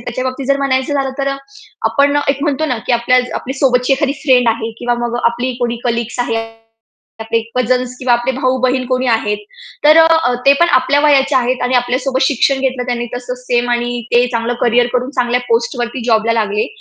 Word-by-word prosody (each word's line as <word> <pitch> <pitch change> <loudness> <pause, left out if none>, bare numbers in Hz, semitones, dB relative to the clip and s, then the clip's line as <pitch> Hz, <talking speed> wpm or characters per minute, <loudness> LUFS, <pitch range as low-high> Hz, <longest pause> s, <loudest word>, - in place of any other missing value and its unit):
त्याच्याबाबतीत 255 +2 -4
जर 275 0 +2
म्हणायचं 270 0 0
झालं 275 -1 -1
तर 275 0 0
अ, 275 - -2 0.5
आपण 285 0 +2
एक 275 0 0
म्हणतो 300 0 0
ना, 250 -6 -2
की - - +1
आपल्या 250 +2 0
सोबतची 250 -1 +2
एखादी 275 0 0
फ्रेंड 250 -5 +3
आहे 225 0 -1
किंवा 240 0 -1
मग 240 0 -3
आपली 245 +2 0
कोणी 240 -1 -1
कलीग्स 235 0 -2
आहेत. 225 -1 -3 0.7
आपले 225 +1 -1 0.2
कझन्स 250 0 0
किंवा 255 -1 0
आपले 240 +2 +1
भाऊ-बहीण 255 0 0
कोणी 255 0 -1
आहेत. 215 -3 0 0.5
तर 305 +1 +7
अ, 325 -5 +4
ते 275 - +8
पण 345 - +4
आपल्या 260 +3 +1
वयाचे 285 -2 +3
आहेत 255 0 0
आणि 250 +1 0
आपल्यासोबत 255 +2 0
शिक्षण 270 0 +2
घेतलं 260 -2 -1
त्यांनी 240 -1 -2
तसंच 250 0 -6
सेम 245 0 0
आणि 240 0 -1
ते 245 +1 +4
चांगलं 230 +1 -1
करियर 240 0 +3
करून 250 +2 -1
चांगल्या 250 -2 0
पोस्टवरती 240 +1 -1
जॉबला 225 -1 +2
लागले. 210 -1 0
250 Hz, 185 wpm, -15 LUFS, 240-265 Hz, 0.7 s, ते